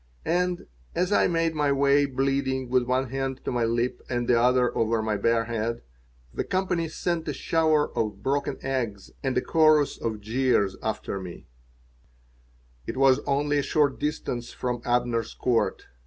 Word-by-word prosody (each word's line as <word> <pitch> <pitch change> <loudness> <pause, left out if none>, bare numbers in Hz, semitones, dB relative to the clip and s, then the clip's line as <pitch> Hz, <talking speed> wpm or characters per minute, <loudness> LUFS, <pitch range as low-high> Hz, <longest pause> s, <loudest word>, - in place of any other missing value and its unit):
And, 180 +1 0 0.3
as 180 +2 0
I - - +4
made 165 -1 +1
my 150 -2 +1
way, 140 +1 +3
bleeding, 135 -1 -1
with 130 -1 +3
one 130 0 0
hand 135 -1 -2
to - - -1
my 120 -2 +1
lip 120 +2 -1
and 120 -1 -1
the - - +4
other 125 +1 +3
over 115 0 +1
my 110 -1 0
bare 115 +3 +2
head, 115 0 -3 0.5
the - - -2
company 185 -3 -1
sent 165 0 -2
a 150 - -1
shower 155 +1 +1
of 105 -3 -2
broken 140 +1 -1
eggs 120 -7 -3
and 130 -2 -1
a - - +3
chorus 155 -3 +3
of 110 -2 -3
jeers 110 -3 +1
after 110 -2 -3
me 90 -2 -9 1.4
It - - -4
was 135 -1 +5
only 145 +1 +1
a - - +2
short 145 0 +1
distance 125 -5 -3
from 125 -2 -3
Abner's 120 -2 0
Court. 120 -2 0
130 Hz, 165 wpm, -26 LUFS, 115-145 Hz, 1.4 s, was